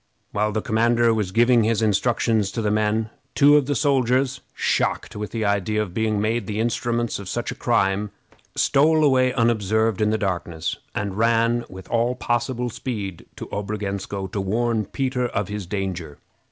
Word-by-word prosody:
While 105 Hz, +1 st, 0 dB
the 110 Hz, 0 st, -2 dB
commander 115 Hz, +1 st, +3 dB
was 105 Hz, -4 st, -1 dB
giving 120 Hz, +2 st, +4 dB
his 115 Hz, 0 st, +1 dB
instructions 110 Hz, -1 st, +1 dB
to 115 Hz, -, -2 dB
the 105 Hz, -, +1 dB
men, 110 Hz, +1 st, 0 dB, 0.2 s
two 145 Hz, 0 st, +6 dB
of 145 Hz, -3 st, +3 dB
the 145 Hz, -, 0 dB
soldiers, 135 Hz, -1 st, +1 dB
shocked -, -, 0 dB
with 105 Hz, 0 st, -4 dB
the 110 Hz, -2 st, -2 dB
idea 100 Hz, +1 st, 0 dB
of 105 Hz, -5 st, -2 dB
being 110 Hz, 0 st, 0 dB
made 110 Hz, 0 st, -1 dB
the 105 Hz, 0 st, -3 dB
instruments 120 Hz, 0 st, -1 dB
of 100 Hz, -2 st, -7 dB
such 120 Hz, +3 st, -3 dB
a -, -, -3 dB
crime, 105 Hz, -3 st, +1 dB, 0.5 s
stole 155 Hz, +3 st, +3 dB
away 130 Hz, -3 st, +4 dB
unobserved 110 Hz, -3 st, +1 dB
in 105 Hz, -, +3 dB
the 110 Hz, -, +1 dB
darkness, 85 Hz, -4 st, -2 dB, 0.2 s
and 100 Hz, -1 st, -3 dB
ran 115 Hz, +1 st, +2 dB
with 95 Hz, 0 st, -10 dB
all 120 Hz, +2 st, +1 dB
possible 120 Hz, 0 st, -1 dB
speed 100 Hz, -8 st, -5 dB
to -, -, -7 dB
Obrogensko 100 Hz, -1 st, -3 dB
to 100 Hz, -, -2 dB
warn 110 Hz, +2 st, 0 dB
Peter 130 Hz, +1 st, -1 dB
of 105 Hz, -4 st, -3 dB
his 105 Hz, -3 st, -5 dB
danger. 90 Hz, -6 st, -4 dB
110 Hz, 170 wpm, -23 LUFS, 100-120 Hz, 0.5 s, two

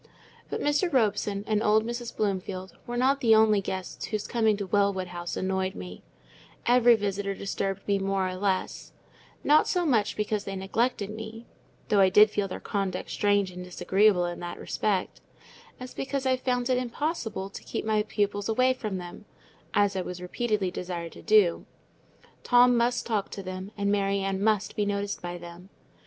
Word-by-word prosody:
But -, -, -3 dB
Mr. 295 Hz, +5 st, +1 dB
Robson 210 Hz, -5 st, +1 dB
and 215 Hz, -1 st, +1 dB
old 215 Hz, 0 st, +3 dB
Mrs. 240 Hz, 0 st, -5 dB
Bloomfield 190 Hz, -2 st, -2 dB
were 240 Hz, 0 st, -3 dB
not 270 Hz, +3 st, +3 dB
the 225 Hz, -2 st, +6 dB
only 215 Hz, -2 st, +5 dB
guests 190 Hz, -1 st, -5 dB
whose 215 Hz, -1 st, -3 dB
coming 220 Hz, -3 st, +2 dB
to 200 Hz, -, -3 dB
Wellwood 190 Hz, -1 st, +1 dB
House 175 Hz, -1 st, -5 dB
annoyed 190 Hz, 0 st, -1 dB
me; 90 Hz, 0 st, -8 dB, 0.6 s
every 240 Hz, 0 st, +6 dB
visitor 200 Hz, -1 st, -2 dB
disturbed 195 Hz, 0 st, -3 dB
me 200 Hz, -1 st, +2 dB
more 195 Hz, -1 st, 0 dB
or 185 Hz, -, -3 dB
less; 190 Hz, 0 st, -2 dB, 0.5 s
not 300 Hz, +1 st, +5 dB
so 360 Hz, -2 st, +1 dB
much 225 Hz, -8 st, +1 dB
because 210 Hz, -1 st, -1 dB
they 195 Hz, 0 st, -5 dB
neglected 205 Hz, +2 st, -1 dB
me 220 Hz, +1 st, -8 dB, 0.4 s
(though 205 Hz, -, +4 dB
I 190 Hz, -1 st, +6 dB
did 210 Hz, +3 st, +6 dB
feel 205 Hz, -2 st, -1 dB
their 185 Hz, -, -6 dB
conduct 195 Hz, -2 st, -3 dB
strange 205 Hz, -2 st, +2 dB
and 180 Hz, 0 st, -8 dB
disagreeable 180 Hz, +1 st, +2 dB
in 175 Hz, 0 st, -4 dB
that 175 Hz, 0 st, -6 dB
respect), 200 Hz, -3 st, -2 dB, 0.6 s
as 255 Hz, 0 st, -8 dB
because 270 Hz, 0 st, -3 dB
I 260 Hz, 0 st, +3 dB
found 250 Hz, -1 st, -1 dB
it 250 Hz, -, +3 dB
impossible 240 Hz, -, -3 dB
to -, -, -9 dB
keep -, -, -4 dB
my 215 Hz, -1 st, +2 dB
pupils 205 Hz, -1 st, -1 dB
away 255 Hz, +3 st, +3 dB
from 215 Hz, -6 st, -4 dB
them, 180 Hz, +3 st, -9 dB, 0.5 s
as 205 Hz, -1 st, +3 dB
I 190 Hz, -, 0 dB
was 180 Hz, 0 st, -6 dB
repeatedly 200 Hz, +1 st, -1 dB
desired 175 Hz, -2 st, -5 dB
to -, -, -12 dB
do: 210 Hz, -6 st, +3 dB, 0.7 s
Tom 245 Hz, 0 st, +5 dB
must 240 Hz, +1 st, +1 dB
talk 210 Hz, -4 st, -1 dB
to 195 Hz, -, -7 dB
them, 185 Hz, +1 st, -6 dB
and 200 Hz, 0 st, +1 dB
Mary 200 Hz, -1 st, +1 dB
Ann 195 Hz, 0 st, -1 dB
must 215 Hz, -1 st, +1 dB
be 210 Hz, -, +1 dB
noticed 200 Hz, 0 st, -2 dB
by 175 Hz, -1 st, -5 dB
them. 175 Hz, +2 st, -11 dB
205 Hz, 180 wpm, -27 LUFS, 190-225 Hz, 0.7 s, the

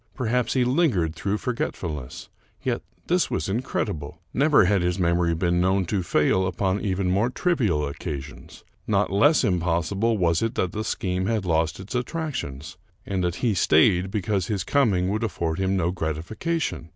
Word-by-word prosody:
Perhaps 125 Hz, 0 st, 0 dB
he 130 Hz, -, +2 dB
lingered 125 Hz, -, +2 dB
through 100 Hz, +5 st, -2 dB
forgetfulness. 90 Hz, -, -4 dB, 0.4 s
Yet -, -, -1 dB, 0.2 s
this -, -, +1 dB
was 80 Hz, -, -2 dB
incredible. 95 Hz, -, -3 dB
Never 145 Hz, -, +4 dB
had 100 Hz, 0 st, +2 dB
his 90 Hz, +1 st, 0 dB
mem 85 Hz, -1 st, +2 dB
ory 85 Hz, -1 st, +1 dB
been 85 Hz, +1 st, +1 dB
known 95 Hz, +1 st, +2 dB
to 95 Hz, +2 st, -1 dB
fail 95 Hz, +2 st, +2 dB
upon 95 Hz, +2 st, -1 dB
even 95 Hz, -2 st, 0 dB
more 100 Hz, +6 st, +2 dB
trivial 115 Hz, -, 0 dB
occasions. 70 Hz, 0 st, -7 dB, 0.2 s
Not -, -, +1 dB
less 145 Hz, +11 st, +4 dB
impossible 95 Hz, +3 st, +1 dB
was 85 Hz, -3 st, +2 dB
it 115 Hz, -, -1 dB
that 90 Hz, -, 0 dB
the 110 Hz, -, -3 dB
scheme 95 Hz, -2 st, -2 dB
had 110 Hz, -3 st, 0 dB
lost 80 Hz, -1 st, 0 dB
its 95 Hz, +6 st, -7 dB
at 125 Hz, -1 st, -1 dB
tractions, 135 Hz, -, -5 dB, 0.3 s
and 95 Hz, -2 st, -2 dB
that 90 Hz, -1 st, 0 dB
he 115 Hz, -, +3 dB
stayed 90 Hz, +1 st, +3 dB
because 100 Hz, -2 st, -1 dB
his 100 Hz, -3 st, -1 dB
coming 105 Hz, -11 st, +2 dB
would 105 Hz, +3 st, -1 dB
afiford 85 Hz, -6 st, -2 dB
him 95 Hz, 0 st, +1 dB
no 85 Hz, -1 st, +1 dB
gratification. 85 Hz, -, -3 dB
95 Hz, 170 wpm, -24 LUFS, 85-110 Hz, 0.4 s, Never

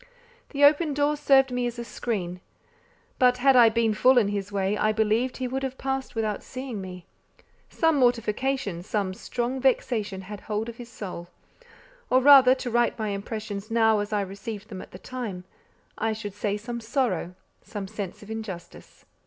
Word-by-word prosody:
The 285 Hz, -1 st, -1 dB
open 295 Hz, +1 st, +5 dB
door 290 Hz, +1 st, +2 dB
served 270 Hz, -3 st, +4 dB
me 245 Hz, -1 st, 0 dB
as 240 Hz, 0 st, -5 dB
a 235 Hz, -, -5 dB
screen; 180 Hz, -8 st, -4 dB, 0.8 s
but 250 Hz, -1 st, +5 dB
had 265 Hz, +1 st, +4 dB
I 235 Hz, -2 st, +8 dB
been 225 Hz, -1 st, +1 dB
full 255 Hz, +4 st, +4 dB
in 215 Hz, -4 st, +4 dB
his 205 Hz, 0 st, -3 dB
way, 195 Hz, 0 st, 0 dB
I 215 Hz, +1 st, +2 dB
believe 220 Hz, +4 st, +1 dB
he 255 Hz, -, -3 dB
would 265 Hz, +2 st, -3 dB
have 265 Hz, -1 st, -4 dB
passed 265 Hz, -1 st, -3 dB
without 215 Hz, -2 st, -1 dB
seeing 255 Hz, -5 st, -6 dB
me. 180 Hz, -2 st, -9 dB, 0.6 s
Some 325 Hz, -2 st, +2 dB
mortification, 245 Hz, -4 st, 0 dB
some 200 Hz, 0 st, -2 dB
strong 245 Hz, +6 st, -3 dB
vexation 220 Hz, -6 st, 0 dB
had 205 Hz, +2 st, -8 dB
hold 215 Hz, +1 st, -3 dB
of 235 Hz, -, -9 dB
his 240 Hz, -1 st, -9 dB
soul: 180 Hz, -6 st, -7 dB, 0.8 s
or 255 Hz, -, +5 dB
rather, 260 Hz, -1 st, +8 dB
to 255 Hz, -2 st, -5 dB
write 240 Hz, +1 st, +2 dB
my 215 Hz, -2 st, -2 dB
impressions 205 Hz, +1 st, -5 dB
now 225 Hz, -2 st, +3 dB
as 205 Hz, +1 st, -3 dB
I 210 Hz, -1 st, +1 dB
received 200 Hz, +2 st, -7 dB
them 190 Hz, -4 st, -7 dB
at -, -, -11 dB
the -, -, -10 dB
time 210 Hz, -3 st, -6 dB, 0.6 s
I 220 Hz, -, 0 dB
should 205 Hz, -2 st, -6 dB
say 205 Hz, 0 st, -2 dB
some 235 Hz, +2 st, -6 dB
sorrow, 225 Hz, -, -1 dB, 0.3 s
some 205 Hz, -3 st, -6 dB
sense 200 Hz, -1 st, -6 dB
of 210 Hz, -, -10 dB
injustice. 210 Hz, -6 st, -8 dB
225 Hz, 180 wpm, -26 LUFS, 205-255 Hz, 0.8 s, I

